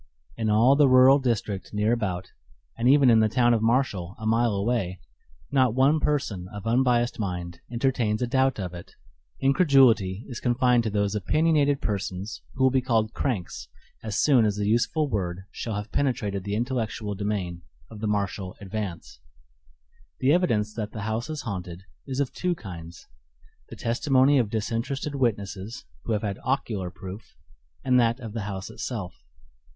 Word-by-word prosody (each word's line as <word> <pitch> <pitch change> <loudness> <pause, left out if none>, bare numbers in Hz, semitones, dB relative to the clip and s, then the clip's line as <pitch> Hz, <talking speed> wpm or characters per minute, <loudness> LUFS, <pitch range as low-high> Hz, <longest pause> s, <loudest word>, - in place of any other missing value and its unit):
In 110 -2 -1
all 115 +6 +5
the 145 -2 +5
rural 130 +2 +7
district 105 -7 -2
near 105 +2 +2
about, 95 -6 -3 0.4
and 120 +2 +2
even 135 -2 +6
in 115 - +6
the 110 0 +3
town 120 +2 +3
of 115 - +1
Marshall, 110 -6 0
a 110 - -8
mile 115 0 +2
away, 100 -3 -1 0.5
not 130 -4 +3
one 140 +4 +4
person 115 -13 -1
of 105 +1 -9
unbiased 120 0 +2
mind 90 -4 -4
entertains 120 -3 0
a 125 - 0
doubt 130 0 +1
of 90 -2 -4
it; 85 - -11 0.5
incredulity 135 - +4
is 120 - -6
confined 125 0 +3
to - - +1
those 100 -1 0
opinionated 145 - +2
persons 100 0 -3
who 130 - 0
will 130 - +5
be 130 0 +2
called 115 -3 0
"cranks" 110 -11 -3 0.3
as 110 -1 -4
soon 135 -6 +5
as 105 -2 +1
the 105 0 -2
useful 120 +8 +1
word 95 -6 -3
shall 110 -3 -4
have 105 +1 -5
penetrated 105 -8 -1
the 100 0 -2
intellectual 115 -3 -2
demesne 95 -4 -3 0.3
of 110 - -9
the 110 - -2
Marshall 100 -2 -2
Advance. 100 - -6 1.0
The 135 +3 +3
evidence 110 - +1
that 110 -2 -5
the 110 - -5
house 110 +6 -2
is 155 -2 -4
haunted 90 -5 -6 0.2
is 135 0 -3
of 140 -3 -1
two 180 -1 -1
kinds; 85 - -10 0.6
the - - -8
testimony 135 +3 +3
of 115 -5 0
disinterested 115 +7 -2
witnesses 110 -3 -2 0.2
who 115 - -1
have 105 - -1
had 100 -2 -3
ocular 110 -8 -1
proof, 95 +4 -10 0.5
and 125 -1 +4
that 120 +1 +2
of 115 -4 -8
the 115 - -3
house 95 +1 -6
itself. 110 -6 -5
110 Hz, 165 wpm, -26 LUFS, 100-130 Hz, 1.0 s, rural